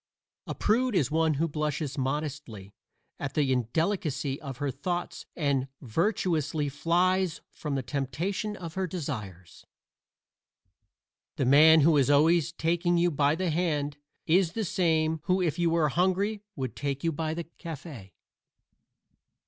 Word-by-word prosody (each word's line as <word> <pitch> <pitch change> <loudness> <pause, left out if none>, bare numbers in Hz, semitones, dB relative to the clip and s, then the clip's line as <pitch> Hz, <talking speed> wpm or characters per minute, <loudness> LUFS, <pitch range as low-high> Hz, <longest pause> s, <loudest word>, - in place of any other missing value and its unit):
A - - -4
prude 240 +2 +1
is 150 -6 +2
one 160 -1 +2
who 165 +4 +1
blushes 150 -2 -2
modestly 135 -7 -4 0.5
at 145 - -4
the 145 -3 +2
indelicacy 145 - -1
of 135 -5 -7
her 145 0 -2
thoughts 175 +7 -4
and 140 -4 0
virtuously 155 - 0
flies 175 +4 +1
from 150 -3 -4
the 135 - -2
temptation 155 - -3
of 170 -4 -7
her 190 +1 -1
desires. 100 - -6 1.7
The 135 - 0
man 155 +4 +7
who 155 +1 +5
is 140 -1 +3
always 160 +3 +4
taking 175 +1 +1
you 175 +1 +3
by 145 0 +2
the 180 0 -1
hand 150 -4 -1 0.3
is 170 0 +3
the 225 -2 -2
same 160 -2 +1
who 185 0 +2
if 175 -2 0
you 170 -1 +3
were 165 -2 +2
hungry 190 +6 +1
would 130 -5 -4
take 140 -1 -3
you 165 - +1
by 160 +1 -3
the 170 - -3
cafe. 150 - -10
155 Hz, 140 wpm, -28 LUFS, 140-175 Hz, 1.7 s, man